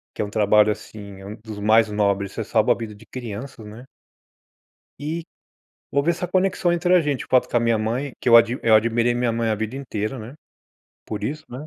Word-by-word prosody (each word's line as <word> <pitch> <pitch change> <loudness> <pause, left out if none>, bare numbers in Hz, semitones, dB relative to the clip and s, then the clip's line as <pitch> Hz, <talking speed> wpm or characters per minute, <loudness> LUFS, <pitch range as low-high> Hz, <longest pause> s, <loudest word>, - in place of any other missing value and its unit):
Que - - -3
é - - 0
um - - -7
trabalho 105 0 +4
assim, 100 -2 -9
é - - -11
um 105 +2 -7
dos 110 -1 -10
mais 110 +1 +4
nobres, 100 -1 0
você 115 - -3
salva 110 +2 +2
a - - +4
vida 115 -2 -6
de 105 +2 -15
crianças, 115 0 -8
né. 110 +4 -10 1.2
E, 160 +3 -4 0.7
houve 140 +4 +1
essa 175 +1 -4
conexão 185 -1 +1
entre 175 +1 +1
a 180 - +5
gente, 145 -4 -2
o - - -27
fato 130 - +3
com - - 0
a - - +3
minha 115 -1 +2
mãe, 120 +6 -2
que - - -6
eu 115 - +8
admi 115 +2 +5
eu 115 - +4
admirei 115 +2 +2
minha 120 -1 0
mãe 115 0 -1
a 110 - +1
vida 110 +3 -4
inteira, 125 -3 -4
né, 120 +4 -9 0.7
por 105 - -4
isso, 155 +3 -4
né. 130 +5 -8
115 Hz, 225 wpm, -22 LUFS, 105-135 Hz, 1.2 s, eu